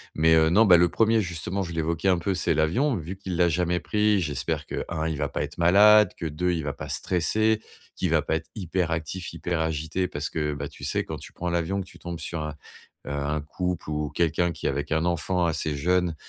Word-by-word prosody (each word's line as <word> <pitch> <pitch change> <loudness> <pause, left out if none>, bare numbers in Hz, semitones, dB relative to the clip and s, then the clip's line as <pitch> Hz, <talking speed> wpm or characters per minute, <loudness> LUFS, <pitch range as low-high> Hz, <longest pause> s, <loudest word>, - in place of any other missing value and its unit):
mais, 80 +1 +4
heu, 80 0 +5
non, 110 +6 +5
bah, 90 -3 +8
le 85 0 +4
1er 115 +2 +3
justement, 90 +2 -3
je 85 - -6
l'évoquais 85 +3 0
un 90 - +4
peu, 95 +3 -1
c'est 90 - +1
l'avion, 115 - +2
vu 85 +4 -6
qu'il 95 -3 -5
l'a 90 -1 +4
jamais 90 +1 +1
pris, 105 +1 +2
j'espère 75 -6 -2
que, - - -4
1 80 0 -2
il 80 -3 -2
va 70 -1 -1
pas - - -2
être - - -7
malade, 100 +4 +6
que 85 - -5
2 90 +4 -1
il 80 -3 -1
va 70 - -3
pas - - -8
stresser, 110 +5 +1 0.3
qu'il - - -1
va - - +3
pas 80 - -1
être 80 0 -5
hyperactif, 85 -2 -2
hyperagité. 80 +1 -2
Parce - - -4
que, 75 -2 -2
bah, 70 0 -4
tu - - -13
sais, - - 0
quand - - -6
tu - - -12
prends 90 0 -3
l'avion 85 +3 -1
que - - -7
tu - - -15
tombes 85 -1 -6
sur 85 -2 -4
un, 75 -1 -5 0.5
heu, - - -5
un 70 +1 -1
couple 90 +1 -4
ou 75 0 -1
quelqu'un 85 +1 +1
qui - - -12
est - - +3
avec 70 +3 -3
un 80 +1 +1
enfant 90 +1 0
assez 80 -2 -1
jeune, 90 +2 +1
85 Hz, 235 wpm, -26 LUFS, 80-90 Hz, 0.5 s, bah